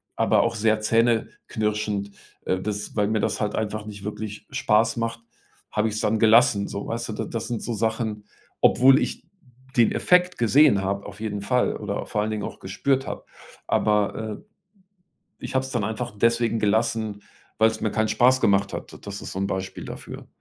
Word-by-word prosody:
aber -, -, +3 dB
auch 115 Hz, 0 st, 0 dB
sehr 110 Hz, 0 st, +2 dB
zähneknirschend 110 Hz, -2 st, 0 dB, 0.3 s
äh, 95 Hz, -, 0 dB
dass 105 Hz, +1 st, -4 dB
weil 105 Hz, -1 st, +2 dB
mir 110 Hz, -1 st, +1 dB
das -, -, -1 dB
halt 105 Hz, 0 st, -1 dB
einfach 110 Hz, -1 st, -3 dB
nicht 100 Hz, -2 st, -9 dB
wirklich 105 Hz, 0 st, -6 dB
Spaß 115 Hz, -5 st, +2 dB
macht, 115 Hz, 0 st, -2 dB, 0.5 s
habe 105 Hz, +1 st, +1 dB
ich 105 Hz, -, -5 dB
es -, -, -2 dB
dann 110 Hz, 0 st, +1 dB
gelassen 110 Hz, -2 st, +5 dB
so, 100 Hz, 0 st, -5 dB
weißt 115 Hz, 0 st, -3 dB
du. -, -, -3 dB
D -, -, -3 dB
das 115 Hz, -2 st, -3 dB
sind 120 Hz, -2 st, -3 dB
so 120 Hz, -, -3 dB
Sachen 110 Hz, -1 st, -2 dB, 0.4 s
obwohl 135 Hz, +3 st, +6 dB
ich -, -, -3 dB, 0.5 s
den 115 Hz, -, +5 dB
Effekt 180 Hz, 0 st, +3 dB
gesehen 120 Hz, -2 st, +5 dB
habe 100 Hz, +1 st, -2 dB
auf 100 Hz, +1 st, -11 dB
jeden 105 Hz, -2 st, -3 dB
Fall 125 Hz, +4 st, +1 dB
oder -, -, -4 dB
vor 105 Hz, -, -1 dB
allen 110 Hz, -, -1 dB
Dingen 105 Hz, -1 st, -3 dB
auch -, -, -6 dB
gespürt 135 Hz, +8 st, -1 dB
habe. -, -, -6 dB, 0.4 s
Aber, 105 Hz, -1 st, +2 dB, 0.2 s
äh, -, -, -21 dB, 1.0 s
ich -, -, -5 dB
habe 130 Hz, 0 st, +2 dB
es 130 Hz, -, -8 dB
dann 120 Hz, -4 st, -1 dB
einfach 110 Hz, -1 st, -4 dB
deswegen 115 Hz, +1 st, +2 dB
gelassen, 110 Hz, -1 st, 0 dB, 0.4 s
weil 110 Hz, 0 st, +6 dB
es -, -, -8 dB
mir 110 Hz, -, 0 dB
keinen 110 Hz, 0 st, +1 dB
Spaß 130 Hz, +1 st, +4 dB
gemacht 100 Hz, 0 st, +3 dB
hat. -, -, -6 dB
D -, -, -9 dB
das 100 Hz, 0 st, -7 dB
ist -, -, -7 dB
so 95 Hz, -, -4 dB
'n 100 Hz, -, 0 dB
Beispiel 95 Hz, -1 st, -4 dB
dafür. -, -, -9 dB
110 Hz, 195 wpm, -24 LUFS, 105-115 Hz, 1.0 s, obwohl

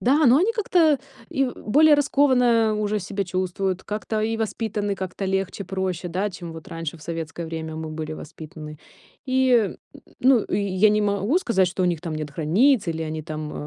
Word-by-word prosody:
Да, 285 Hz, +5 st, +4 dB
но 245 Hz, +2 st, +7 dB
они 395 Hz, +8 st, +2 dB
как-то 350 Hz, -, +3 dB, 0.3 s
и 270 Hz, -, +1 dB
в 250 Hz, -, -4 dB, 0.2 s
более 305 Hz, +4 st, +7 dB
раскованно 250 Hz, -6 st, +3 dB
уже 210 Hz, 0 st, -1 dB
себя 200 Hz, +2 st, -3 dB
чувствуют, 185 Hz, +1 st, -2 dB
как-то 215 Hz, +1 st, -3 dB
и 225 Hz, +1 st, 0 dB
воспитаны 215 Hz, -2 st, -2 dB
как-то 190 Hz, 0 st, -5 dB
легче, 190 Hz, 0 st, -2 dB
проще, 185 Hz, -2 st, -3 dB
да, 190 Hz, +5 st, -1 dB
чем 175 Hz, -2 st, -8 dB
вот 160 Hz, -1 st, -10 dB
раньше, 165 Hz, 0 st, -5 dB
в 155 Hz, -, -16 dB
советское 165 Hz, +1 st, -5 dB
время, 160 Hz, -1 st, -5 dB
мы 160 Hz, 0 st, -5 dB
были 155 Hz, 0 st, -5 dB
воспитаны. 155 Hz, -1 st, -9 dB, 0.5 s
И, 260 Hz, 0 st, +2 dB
э, 245 Hz, -, +7 dB
м, -, -, -7 dB, 0.2 s
м, -, -, -17 dB
ну, 260 Hz, 0 st, +5 dB
и -, -, -1 dB
и 200 Hz, -1 st, -1 dB
я 200 Hz, +3 st, +5 dB
не 210 Hz, 0 st, +2 dB
могу 205 Hz, -, +1 dB
сказать, 210 Hz, -, +2 dB
что 185 Hz, +1 st, -2 dB
у -, -, +3 dB
них 170 Hz, -3 st, 0 dB
там 165 Hz, -2 st, -4 dB
нет 155 Hz, -1 st, -4 dB
границ, 195 Hz, -, +2 dB
или 160 Hz, -1 st, -2 dB
они 155 Hz, 0 st, -4 dB
там, 155 Hz, 0 st, -6 dB
195 Hz, 205 wpm, -23 LUFS, 165-235 Hz, 0.5 s, но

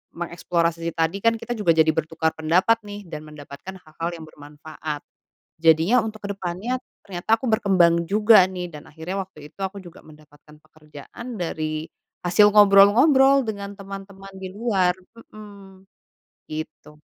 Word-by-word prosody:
mengeksplorasi 170 Hz, -1 st, -2 dB
tadi 165 Hz, +4 st, 0 dB
kan 230 Hz, +2 st, +2 dB
kita 230 Hz, +1 st, -8 dB
juga 170 Hz, -6 st, +3 dB
jadi 160 Hz, 0 st, +4 dB
bertukar 160 Hz, +1 st, -1 dB
pendapat 180 Hz, +9 st, +3 dB
nih, 205 Hz, 0 st, -8 dB
dan 165 Hz, -5 st, -8 dB
mendapatkan 150 Hz, +4 st, -10 dB
hal-hal 160 Hz, +2 st, -5 dB
yang 165 Hz, -, -10 dB
bermanfaat. 150 Hz, 0 st, -8 dB, 0.6 s
Jadinya, 165 Hz, +9 st, +4 dB
untuk 215 Hz, -1 st, -7 dB
ke 200 Hz, -, -2 dB
depannya 195 Hz, +7 st, -4 dB, 0.2 s
ternyata 195 Hz, +3 st, 0 dB
aku 260 Hz, -, -6 dB
berkembang 175 Hz, -6 st, +3 dB
juga 210 Hz, +1 st, +6 dB
nih, 180 Hz, -2 st, -6 dB
dan 150 Hz, -1 st, -11 dB
akhirnya 165 Hz, +5 st, -5 dB
waktu 155 Hz, -6 st, -10 dB
itu, -, -, -63 dB
aku 195 Hz, +1 st, -4 dB
juga 175 Hz, 0 st, -13 dB
mendapatkan 150 Hz, -1 st, -19 dB
pekerjaan 155 Hz, -, -11 dB
dari 155 Hz, -3 st, -3 dB, 0.4 s
hasil 180 Hz, +4 st, +5 dB
ngobrol-ngobrol 235 Hz, +8 st, +6 dB
dengan 200 Hz, -2 st, -6 dB
teman-teman 195 Hz, 0 st, -10 dB
di 190 Hz, -, -6 dB
luar 190 Hz, -4 st, 0 dB, 0.3 s
mhm, 200 Hz, -3 st, -14 dB, 0.6 s
gitu. 155 Hz, -1 st, -8 dB
180 Hz, 140 wpm, -23 LUFS, 160-205 Hz, 0.6 s, juga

